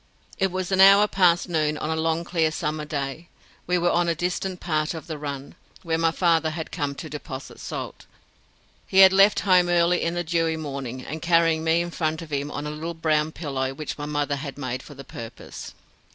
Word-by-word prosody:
It 190 -2 +1
was 185 0 -3
an 190 0 +4
hour 200 +2 +8
past 180 -4 +3
noon 155 -3 0
on 155 - -3
a - - 0
long 160 +1 0
clear 165 -2 +1
summer 155 -1 -3
day. 145 +2 -4 0.4
We 180 0 +2
were 175 0 +2
on 175 0 +2
a 165 - +1
distant 180 +2 -2
part 155 -1 -1
of 160 - -7
the 160 - -5
run, 140 -2 -6 0.3
where 165 -2 -1
my 165 0 +3
father 165 -1 +2
had 160 0 -6
come 145 -4 -2
to 160 - -7
deposit 140 -2 -8
salt. - - -7 0.8
He 190 - -2
had 190 - +5
left 195 +2 +5
home 180 -2 +4
early 175 0 +3
in 170 +1 -1
the 175 - -1
dewy 165 -1 0
morning, 135 -4 -5 0.2
carrying 165 -1 +3
me 165 +1 +3
in 175 0 -4
front 160 0 -2
of 155 - -12
him 140 +1 -1
on 145 0 -5
a 150 - -3
little 165 +3 -5
brown 155 -1 +1
pillow 135 -4 -3
which 155 +1 -5
my 145 - -4
mother 145 -1 -1
had 140 -1 -7
made 130 -2 -4
for 145 - -13
the 135 - -9
purpose. 115 -2 -9
160 Hz, 210 wpm, -24 LUFS, 150-175 Hz, 0.8 s, hour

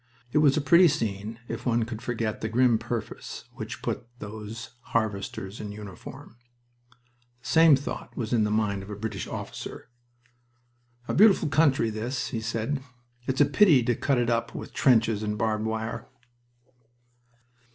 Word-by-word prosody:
It 150 - +3
was 150 -1 +4
a - - +2
pretty 170 +5 +6
scene 110 -5 -2
if - - -5
one 120 -2 +2
could 110 -1 -6
forget 115 -3 -2
the 110 - -2
grim 120 0 +3
purpose - - -5
which - - -6
had - - -20
put - - -3
those 110 +1 -8 0.3
harvesters 100 -2 -3
in 105 -1 -5
uniform. 105 +2 -10 1.1
The - - -9
same 160 -2 +7
thought 135 +2 -6
was 115 -1 -2
in 115 -3 +3
the 105 - +1
mind 105 -2 0
of 95 - -10
a 105 - -5
British 105 -1 -4
officer. - - -7 1.2
"A - - -1
beautiful 195 -5 +5
country, 140 -6 +3
this," 120 +4 -3
he 115 - -3
said. 115 +5 -2 0.5
"It's 130 +2 +1
a - - +8
pity 145 - +5
to 120 0 +1
cut 140 +2 +1
it 120 -1 +1
up 115 0 -1
with - - -7
trenches 115 -4 +3
and 105 0 -2
barbed 110 0 0
wire." 110 +1 -3
115 Hz, 160 wpm, -27 LUFS, 110-130 Hz, 1.2 s, a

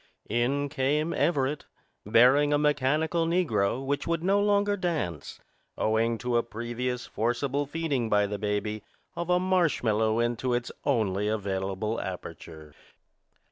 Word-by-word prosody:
In 130 +5 +1
came 145 +4 0
Everett, 145 -1 0 0.4
bearing 130 +7 +5
a 145 - +4
mechanical 150 +3 +1
negro 130 - +1
which 140 +1 -2
would 165 0 -1
no 195 +2 +3
longer 205 0 +2
dance, 160 - -3 0.4
owing 115 +1 +1
to 125 +1 0
a - - +4
previous 120 +2 -4
forcible 130 +5 -1
feeding 145 -7 -1
by 105 -1 +3
the 100 0 -4
baby 105 0 -2 0.3
of 170 0 -4
a 180 0 +4
marshmallow 125 - +1
into 120 +1 0
its 120 0 -3
only 105 -7 +1
available 100 +1 -2
aperture. 80 -4 -8
125 Hz, 130 wpm, -27 LUFS, 110-150 Hz, 0.4 s, bearing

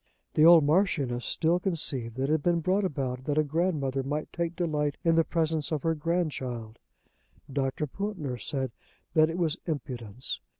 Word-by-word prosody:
The 155 - +5
old 170 -2 +9
Marchioness 145 -7 +1
still 170 +2 +2
conceived 140 - 0
that 130 - -2
it 135 - 0
had 155 -1 +2
been 170 +2 +2
brought 185 +5 +1
about 130 -7 -2
that 145 0 -1
a 155 - +5
grandmother 150 -4 0
might 145 +3 -4
take 170 0 -2
delight 150 -4 -1
in 165 -1 +4
the 165 0 +4
presence 160 -2 0
of 150 -4 -1
her 165 - +2
grandchild. 145 -9 -2 0.7
Dr. 135 +2 -1
Pountner 155 - -4
said 130 +1 -2 0.4
that 155 -1 +5
it 165 - -3
was 170 -2 0
impudence. 125 -7 -4
155 Hz, 170 wpm, -28 LUFS, 135-170 Hz, 0.7 s, old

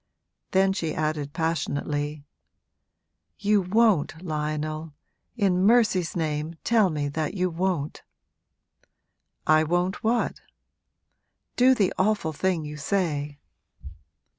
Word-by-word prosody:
Then 190 0 +3
she 165 -5 -3
added 155 -2 -2
passionately, 150 -2 -2 1.1
'You 205 0 +2
won't, 190 -5 +2
Lionel; 155 0 -3 0.4
in 190 -5 +2
mercy's 210 -6 +3
name 155 -1 -2
tell 220 -5 +3
me 150 -3 -2
that 155 +4 -3
you 185 -1 0
won't!' 170 -3 -2 1.4
'I 155 0 +4
won't 175 +6 -1
what?' 235 +2 0 1.1
'Do 255 +1 +5
the 200 -6 +1
awful 190 -5 +1
thing 175 0 -1
you 150 0 -7
say.' 150 -4 -1
165 Hz, 100 wpm, -26 LUFS, 150-195 Hz, 1.4 s, Do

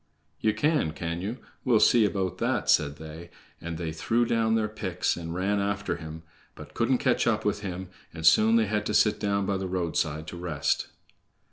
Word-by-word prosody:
"Ye 110 - +2
can, 140 - +1
can 85 +1 -4
ye? 110 +6 -4 0.3
We'll 120 -4 +4
see 115 0 +5
about 95 -3 -2
that," - - +1
said 70 -1 +2
they; 80 +2 -9 0.3
and 85 -1 -5
they 80 -1 -3
threw 115 +9 +1
down 115 -1 +1
their 110 -1 +1
picks 95 -4 -2
and 85 -1 -6
ran 100 +3 0
after 100 0 -1
him, 80 0 -9 0.3
but - - -12
couldn't - - +2
catch - - +1
up - - +1
with - - 0
him, 95 -2 -5 0.2
and 80 -1 -6
soon 110 +8 +6
they 115 -1 +4
had 105 0 -1
to 105 - -1
sit 105 - +3
down 100 -1 0
by 100 0 0
the 95 0 -3
roadside 80 -4 -1
to 85 - -8
rest. 85 -4 -1
95 Hz, 200 wpm, -27 LUFS, 85-105 Hz, 0.3 s, soon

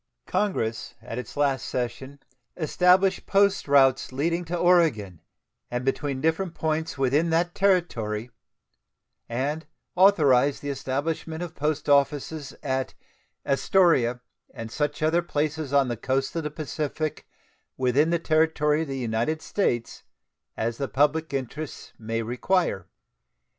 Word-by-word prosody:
Congress 115 - -2
at 115 - -6
its 125 +3 -9
last 140 -2 +1
session 125 +3 -4 0.4
established 180 +3 +3
post 200 -2 +2
routes 135 -2 +4
leading 165 +6 -1
to 175 +1 -3
Oregon, 155 - +2 0.5
and 120 +1 -3
between 135 0 -1
different 160 +2 0
points 160 0 -2
within 140 +5 +2
that 170 +2 +1
Territory, 125 - 0 1.0
and 145 +7 -2 0.3
authorized 145 -9 +4
the 145 - -2
establishment 155 +5 -3
of 170 -2 -7
post 150 -1 -2
offices 145 +1 +1
at 130 -1 -2 0.5
"Astoria 135 -5 +3 0.3
and 115 -1 -8
such 145 +3 -2
other 165 +3 +3
places 155 -3 -2
on 140 -2 +3
the 120 -1 -3
coasts 135 +5 -1
of 165 - 0
the 150 - -3
Pacific 155 0 -4 0.5
within 130 +5 +2
the 170 - +2
territory 155 -2 +2
of 160 - -3
the 135 -1 -4
United 120 +5 -1
States 120 - -1 0.6
as 115 +1 -2
the 140 - -1
public 150 +4 +1
interests 140 +3 -5
may 115 +1 -3
require." 125 - 0
145 Hz, 125 wpm, -25 LUFS, 130-160 Hz, 1.0 s, routes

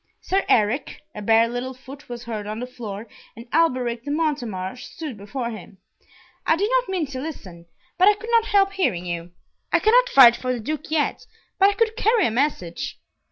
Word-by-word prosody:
"Sir 385 +1 0
Eric;" 225 +5 +1
a 210 - -7
bare 225 +2 +4
little 245 +2 -4
foot 275 +3 -13
was 240 0 -6
heard 215 -3 -5
on 215 +1 -4
the 250 - -3
floor, 225 -4 -8 0.3
and 230 - -10
Alberic 255 -7 +1
de 285 - -6
Montemar 250 - -2
stood 280 +2 -8
before 235 +4 -5
him. 205 -2 -10 0.7
"I - - +3
did 405 +7 -1
not - - +1
mean 365 -4 0
to 265 -2 -7
listen, 185 - -8 0.3
but 370 - +6
I 420 - +6
could 450 +3 -8
not 460 -1 +4
help 400 -2 +3
hearing 240 - 0
you. 170 0 -5 0.4
I - - +5
cannot - - +4
fight 245 - +8
for 255 +1 -3
the 245 - -4
Duke 305 +7 -5
yet, 310 -2 -1 0.3
but 390 +1 +6
I - - 0
could 445 0 0
carry 445 -3 +3
a - - +1
message." 225 - -2
255 Hz, 200 wpm, -23 LUFS, 225-360 Hz, 0.7 s, fight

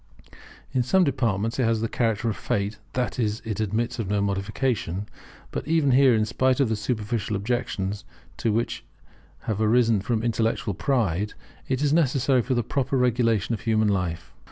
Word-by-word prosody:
In 130 - +1
some 185 +10 +3
departments 115 - 0
it - - +3
has 115 -1 +2
the 115 - -1
character 115 -1 0
of 110 - 0
fate; 105 +1 -2
that 125 -1 -2
is, 110 -2 0
it 110 -1 -3
admits 110 +3 -1
of 105 -4 -2
no 105 0 +1
modification. 100 0 -1 0.4
But - - -4
even 155 -4 +3
here, 130 -1 +6
in 110 -1 +2
spite 130 +4 +1
of 135 -5 +3
the 110 - +1
superficial 105 -1 -2
objections 105 -2 -2 0.3
to - - -2
it - - +1
which 115 +1 -2 0.6
have 110 -1 -2
arisen 115 -1 +3
from 115 +1 -1
intellectual 115 -2 0
pride, 105 - 0 0.3
it 130 +2 0
is 145 0 +2
necessary 135 -4 +3
for 130 +2 -1
the 120 - +1
proper 135 +2 -1
regulation 120 -3 +2
of 110 - -3
human 110 -2 +2
life. 90 -4 -2
115 Hz, 180 wpm, -25 LUFS, 105-125 Hz, 0.6 s, here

